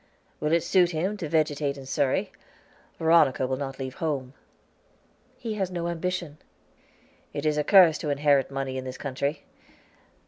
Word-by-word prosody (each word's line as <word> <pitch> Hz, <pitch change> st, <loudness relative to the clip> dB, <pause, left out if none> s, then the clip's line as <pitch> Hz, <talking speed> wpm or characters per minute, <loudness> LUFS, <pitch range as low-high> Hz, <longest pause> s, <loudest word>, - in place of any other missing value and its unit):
"Will 150 Hz, -, -1 dB
it 170 Hz, 0 st, +3 dB
suit 180 Hz, -2 st, +3 dB
him 180 Hz, +5 st, -1 dB
to 165 Hz, -6 st, -5 dB
vegetate 150 Hz, -2 st, 0 dB
in 135 Hz, -, -9 dB
Surrey? 135 Hz, 0 st, 0 dB, 0.7 s
Veronica 160 Hz, -5 st, +4 dB
will 130 Hz, +1 st, -1 dB
not 135 Hz, -1 st, -5 dB
leave 130 Hz, -1 st, -5 dB
home." 140 Hz, -5 st, -2 dB, 1.0 s
"He 230 Hz, -3 st, -4 dB
has 195 Hz, -3 st, -2 dB
no 170 Hz, -2 st, -3 dB
ambition." 170 Hz, -2 st, -3 dB, 0.9 s
"It 145 Hz, 0 st, -4 dB
is 155 Hz, -1 st, +2 dB
a 150 Hz, -, +1 dB
curse 180 Hz, -3 st, +6 dB
to 150 Hz, -, -3 dB
inherit 145 Hz, -1 st, +2 dB
money 135 Hz, -1 st, -3 dB
in -, -, -6 dB
this 130 Hz, 0 st, -7 dB
country. 140 Hz, +2 st, -3 dB
Mr. -, -, -32 dB
150 Hz, 165 wpm, -26 LUFS, 135-170 Hz, 1.0 s, curse